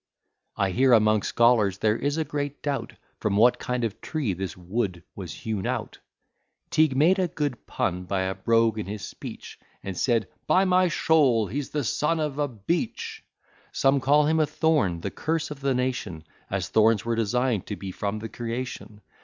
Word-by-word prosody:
I 95 -1 +1
hear, 130 +5 +4
among 110 -2 +4
scholars 115 -5 +3
there 105 +1 +2
is 145 +5 -1
a 160 - 0
great 145 -1 -4
doubt, 140 -2 -2 0.3
From 100 -1 0
what 120 +3 +5
kind 125 -1 -2
of 110 -2 -3
tree 140 -11 -2
this 90 -1 -5
Wood 90 -1 -3
was 90 -5 -7
hewn 105 0 -4
out, - - -3 0.7
Teague 155 -4 +3
made 175 +7 +4
a 185 - +2
good 145 -6 -4
pun 90 0 -2
by 95 +1 -1
a 95 0 -1
brogue 115 +3 +2
in 105 - -4
his 105 0 -5
speech: - - -9 0.2
And 95 -2 -5
said, 115 0 +1 0.2
"By 190 +1 +4
my 185 0 +4
shoul, 145 -9 +3
he's 135 +8 -4
the 150 -1 -2
son 155 +7 0
of 150 -2 -2
a 145 - +2
BEECH." 130 - -3 0.5
Some 135 +1 +3
call 145 +3 +4
him 160 +2 +2
a 155 - +3
thorn, 135 - +1
the 100 - -3
curse 160 -1 -2
of 150 - -7
the 135 -1 +1
nation, 125 -10 -2 0.3
As 95 -3 -2
thorns 110 -1 +3
were 115 0 0
design'd 115 -1 0
to 105 - -3
be 95 -1 -6
from 100 +3 -3
the 110 +1 -5
creation. 115 -3 -6
115 Hz, 185 wpm, -26 LUFS, 100-145 Hz, 0.7 s, what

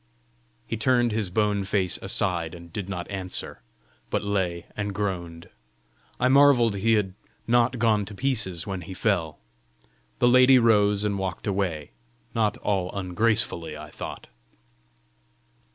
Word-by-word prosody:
He 115 - -4
turned 120 +1 +2
his 105 -3 -1
bone 105 +1 +1
face 95 -2 0
aside, 85 -2 0
and 85 -1 -13
did 100 -2 -5
not 90 -3 -4
answer, 95 -8 -4 0.5
but - - -1
lay 95 -4 -1
and 100 -1 -3
groaned. 85 -5 -4 0.7
I 125 - +3
marvelled 130 -6 +5
he 115 +4 +2
had 100 -4 +1 0.3
not 120 +1 +2
gone 110 -3 +2
to 105 +1 -9
pieces 100 -9 -1
when 95 -2 -4
he 95 +2 -8
fell. 90 -7 0 0.8
The 120 - +3
lady 130 +1 +7
rose 105 -4 +3
and 100 -2 -1
walked 95 -2 -4
away 90 -7 -2 0.4
not 110 -3 +1
all 95 -3 -1
ungracefully, 90 -4 -1
I 75 0 -10
thought. - - -8
100 Hz, 135 wpm, -25 LUFS, 90-115 Hz, 0.8 s, lady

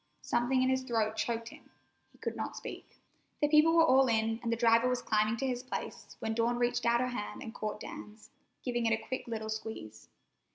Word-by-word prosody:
Something 255 +2 +2
in 255 - +2
his 260 0 +2
throat 225 -4 0
choked 230 +1 -2
him. - - -15 0.4
He - - -23
could - - -4
not - - -4
speak. - - -8 0.4
The 295 - +3
people 310 +2 +5
were 330 -1 +7
all 265 -2 +5
in, 225 -1 +1
and 235 -1 -2
the - - +2
driver 230 +1 +4
was 250 0 0
climbing 215 +1 +2
to 270 - -2
his 250 -2 -1
place, 255 - -6
when 220 - -2
Dawn 235 +1 +1
reached 240 0 +1
out 235 +1 +4
her 255 - 0
hand 225 +1 -5
and 225 -3 -7
caught 215 0 -4
Dan's, 210 +1 -10 0.3
giving 240 -2 0
it 225 0 +2
a 220 - -14
quick 260 - -4
little 220 -2 -4
squeeze. 215 - -6
235 Hz, 215 wpm, -32 LUFS, 220-255 Hz, 0.4 s, were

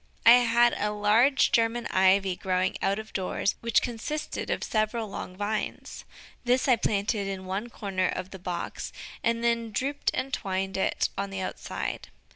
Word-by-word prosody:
I 230 - +10
had 240 0 +4
a 210 - +1
large 215 +6 +3
German 230 +1 +2
Ivy 190 0 +3
growing 185 0 0
out 195 +1 +1
of 220 0 -8
doors, 190 +1 0
which 235 -1 +2
consisted 255 +6 -4
of - - -1
several 215 +1 0
long 185 -2 -7
vines. 210 +1 -4 0.4
This 250 +2 +2
I 255 - +6
planted 205 -1 0
in 190 -1 -5
one 195 +5 -3
corner 190 -5 -1
of 185 +1 -4
the 190 - -9
box, 175 -1 -4 0.3
and 230 0 +1
then 235 -1 +1
drooped 275 +7 -1
and 270 +1 -3
twined 190 0 -2
it 190 - +1
on 200 0 -2
the 195 -1 -4
outside. 185 - -4
210 Hz, 165 wpm, -27 LUFS, 190-235 Hz, 0.4 s, I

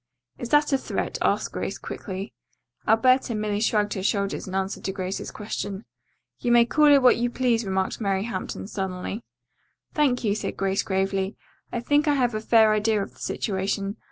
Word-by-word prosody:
"Is 240 - -5
that 295 +1 +3
a 270 - +3
threat?" - - -3
asked - - +1
Grace - - -4
quickly. 195 0 -6 0.5
Alberta 240 +2 +4
merely 210 -1 -1
shrugged 210 -1 +1
her 190 - -4
shoulders 200 0 -1
in 185 - -5
answer 195 +1 -2
to 190 - -2
Grace's 190 0 -4
question. 205 -1 -5 0.5
"You 240 - 0
may 235 0 +6
call 300 +5 +4
it 285 -2 +6
what 250 - +6
you 240 +1 0
please," 240 -2 +1
remarked 190 +3 -1
Mary 195 -2 0
Hampton 195 -5 -5
sullenly. 190 +2 -4 0.7
"Thank 275 -5 +2
you," 205 -3 +2
said 215 - -4
Grace 195 0 +1
gravely. 195 +1 -1 0.3
"I 240 - -2
think 290 +5 +2
I 295 - +4
have 245 -3 +1
a 215 - -2
fair 220 -1 +5
idea 215 -1 +1
of - - -10
the - - -21
situation. 195 +1 -2
215 Hz, 185 wpm, -25 LUFS, 195-240 Hz, 0.7 s, may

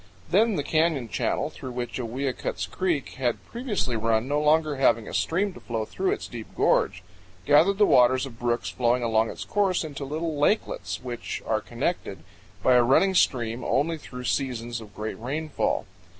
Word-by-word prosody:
Then 215 +3 +4
the 145 - -1
canyon 155 -6 +1
channel 95 - -1
through 130 - -8
which 120 0 -4
Owiyukuts 125 -6 -3
Creek 170 -7 0
had 120 -3 -1
previously 225 - -2
run, 110 +1 +1
no 145 +2 +1
longer 150 -1 +3
having 115 -4 +3
a - - -7
stream 190 +4 0
to - - -11
flow 115 -2 -3
through 190 - -2
its - - -2
deep 115 -3 -8
gorge, - - +2 0.4
gathered 165 +7 +5
the 210 - +6
waters 130 -3 +4
of 115 -4 -11
brooks 120 0 -1
flowing 125 0 +1
along 110 -1 +2
its - - -7
course 195 -4 +1
into 145 -3 -6
little 155 +2 -3
lakelets, 150 - 0
which 120 -2 -5
are - - 0
connected - - -3 0.4
by 130 - +5
a 125 -1 +6
running 165 +10 +4
stream 120 -8 +1
only 160 +3 0
through 125 -3 -9
seasons 120 -2 -2
of 105 -3 -13
great 110 +1 -5
rainfall. 145 +1 -2
130 Hz, 175 wpm, -26 LUFS, 120-160 Hz, 0.4 s, the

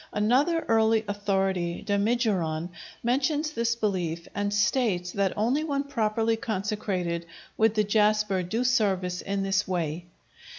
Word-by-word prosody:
Another 270 +11 +2
early 225 -1 +3
authority, 195 -4 -1
Damigeron, 200 -6 0 0.3
mentions 290 +5 +1
this 235 -3 0
belief, 180 -7 -2
and 205 0 -1
states 210 -4 +1
that 200 -2 0
only 245 +8 +1
when 280 -3 -1
properly 225 -4 0
consecrated 195 -5 -2 0.3
would 220 0 +2
the 215 - +3
jasper 210 -2 +2
do 220 +7 -2
service 195 -8 +1
in 195 0 -2
this 195 +1 0
way. 170 -2 -2
210 Hz, 125 wpm, -27 LUFS, 185-230 Hz, 0.3 s, early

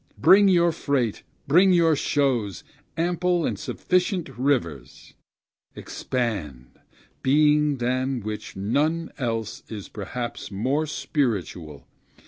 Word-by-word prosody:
bring 200 +1 +6
your 175 -2 +4
freight, 140 -8 -1 0.3
bring 180 +7 +5
your 165 -3 +4
shows, 125 - 0 0.3
ample 175 0 +1
and - - -2
sufficient 180 -1 -1
rivers! 95 - -2 0.6
Expand, 90 - -4 0.4
being 150 +1 +3
than 130 +1 -1
which 110 +1 -6
none 150 +12 0
else 115 -4 -3
is 105 -3 -7
perhaps 120 +4 -6
more 130 +10 -1
spiritual! 95 - -3
130 Hz, 100 wpm, -24 LUFS, 105-155 Hz, 0.6 s, bring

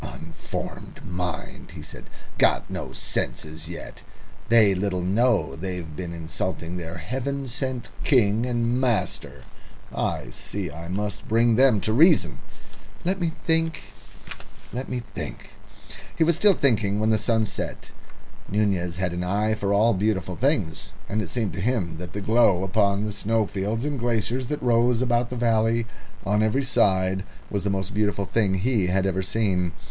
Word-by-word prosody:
"Unformed - - -7
mind!" 90 -4 -5
he 75 - -8
said. 75 - -10 0.3
"Got - - +3
no - - -4
senses 80 +1 -3
yet! 85 - -8 0.5
They 110 -4 +6
little 95 -1 -1
know 100 -2 +2
they've 90 -2 -5
been 85 +1 -5
insulting 85 +1 -4
their 85 0 -5
heaven 135 - -3
sent 130 0 -3
king 115 -5 +3
and 120 +1 0
master. 115 -8 -1 0.5
I - - -2
see 100 -6 -3
I 85 +2 -8
must 100 +2 -3
bring 115 +1 +4
them 130 -3 +5
to 110 +4 0
reason. 145 - +5 0.7
Let 185 +1 0
me 165 -2 0
think 165 0 +1 0.9
let 125 +2 -4
me 125 -1 -3
think." - - -6 0.6
He 165 - +3
was 170 0 +4
still 205 +1 +5
thinking 110 -8 +2
when 110 +1 +2
the 110 - +3
sun 110 0 +2
set. 100 - -5 0.6
Nunez 95 -4 +1
had 90 -1 -1
an 90 +1 -2
eye 105 +4 +1
for 100 -2 -1
all 110 +3 +4
beautiful 95 -3 0
things, 115 - 0
and 105 +3 -1
it 90 - -5
seemed 115 -5 -2
to 95 - -4
him 95 -8 0
that 90 +1 -8
the 105 - -4
glow 105 -4 +4
upon 100 +1 +2
the 105 - -2
snowfields 105 +2 -1
and 145 -2 -2
glaciers 120 +1 0
that 150 0 -3
rose 120 0 +3
about 120 -1 +1
the 125 - -5
valley 115 -1 +2 0.4
on 105 +2 +2
every 110 +6 +2
side 95 -6 +2 0.3
was 100 -3 -1
the 100 - 0
most 95 +1 -2
beautiful 105 -1 0
thing 100 -2 +1
he 105 -1 +1
had 95 +1 +1
ever 95 -1 0
seen. 95 -3 0
105 Hz, 160 wpm, -25 LUFS, 95-120 Hz, 0.9 s, They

